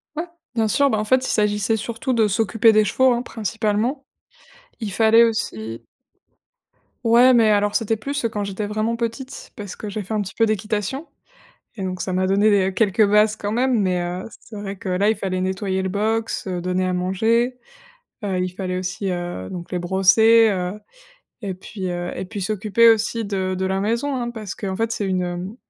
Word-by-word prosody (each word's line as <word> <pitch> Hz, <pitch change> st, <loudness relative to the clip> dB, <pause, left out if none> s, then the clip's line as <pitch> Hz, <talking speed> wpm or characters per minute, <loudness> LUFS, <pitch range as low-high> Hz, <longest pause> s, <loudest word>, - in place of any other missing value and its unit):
Ouais, 325 Hz, +3 st, -2 dB, 0.3 s
bien 220 Hz, -1 st, +2 dB
sûr. 280 Hz, +6 st, +3 dB
Bah, 215 Hz, -, +1 dB
en 215 Hz, -, 0 dB
fait, 260 Hz, +3 st, +2 dB
il -, -, -3 dB
s'agissait 210 Hz, +1 st, +1 dB
surtout 235 Hz, +5 st, -3 dB
de 220 Hz, -2 st, +3 dB
s'occuper 225 Hz, +2 st, +3 dB
des 215 Hz, 0 st, +4 dB
chevaux, 260 Hz, +5 st, +3 dB
hein, 240 Hz, -, -1 dB
principalement. 225 Hz, +3 st, -2 dB, 0.8 s
Il 205 Hz, -4 st, -4 dB
fallait 225 Hz, +2 st, +5 dB
aussi 115 Hz, -, -3 dB, 1.2 s
Ouais, 240 Hz, +3 st, +6 dB
mais 225 Hz, -2 st, +5 dB
alors, 205 Hz, 0 st, +2 dB
c'était 225 Hz, -1 st, +1 dB
plus, 280 Hz, +3 st, -3 dB
heu, -, -, +2 dB
quand 210 Hz, -2 st, -3 dB
j'étais 200 Hz, +1 st, -4 dB
vraiment 215 Hz, +2 st, -1 dB
petite, 235 Hz, +3 st, -5 dB
parce 205 Hz, -3 st, -7 dB
que 215 Hz, -, -7 dB
j'ai 205 Hz, +1 st, -4 dB
fait 220 Hz, -, -6 dB
un 210 Hz, -, +1 dB
petit 190 Hz, -, -6 dB
peu 225 Hz, -, +3 dB
d'équitation 215 Hz, -, -2 dB, 0.7 s
et 195 Hz, -, -5 dB
donc 185 Hz, -1 st, -3 dB
ça 185 Hz, -, -3 dB
m'a 185 Hz, +1 st, +1 dB
donné 200 Hz, +3 st, +3 dB
des 190 Hz, -2 st, +2 dB
quelques 210 Hz, 0 st, +3 dB
bases, 210 Hz, +1 st, +4 dB
quand 205 Hz, 0 st, -3 dB
même, 245 Hz, -1 st, +2 dB
mais, 180 Hz, -2 st, +1 dB
heu, 180 Hz, +4 st, -4 dB
c'est 215 Hz, -, -12 dB
vrai 200 Hz, -1 st, -5 dB
que, 185 Hz, -, -7 dB
là, 190 Hz, +3 st, +2 dB
il 220 Hz, -, +2 dB
fallait 185 Hz, -1 st, -2 dB
nettoyer 190 Hz, 0 st, -1 dB
le 190 Hz, -, -2 dB
box, 220 Hz, +2 st, -1 dB
heu, 180 Hz, -2 st, -3 dB
donner 180 Hz, +1 st, -1 dB
à 185 Hz, -, 0 dB
manger, 225 Hz, +7 st, +1 dB, 0.7 s
heu, 190 Hz, -3 st, -1 dB
il 180 Hz, 0 st, -1 dB
fallait 185 Hz, -1 st, -4 dB
aussi, 185 Hz, +1 st, -3 dB
heu, 175 Hz, -, -4 dB
donc, 175 Hz, 0 st, -8 dB
les 180 Hz, -, 0 dB
brosser, 195 Hz, +5 st, +5 dB
heu, 185 Hz, +1 st, -3 dB, 0.6 s
et 195 Hz, -2 st, -3 dB
puis, 190 Hz, +1 st, -7 dB
heu, 175 Hz, 0 st, -3 dB
et 190 Hz, -, -4 dB
puis 200 Hz, -1 st, -6 dB
s'occuper 215 Hz, +3 st, +4 dB
aussi 225 Hz, +1 st, +1 dB
de 190 Hz, -2 st, -2 dB
de 190 Hz, +1 st, -2 dB
la 190 Hz, +1 st, 0 dB
maison, 235 Hz, +7 st, -1 dB
hein, 240 Hz, -1 st, -2 dB
parce 215 Hz, -5 st, -7 dB
qu'en 190 Hz, -2 st, -4 dB
fait, 225 Hz, +1 st, -1 dB
c'est 205 Hz, -, -2 dB
une 180 Hz, +2 st, -3 dB
210 Hz, 205 wpm, -22 LUFS, 185-225 Hz, 1.2 s, Ouais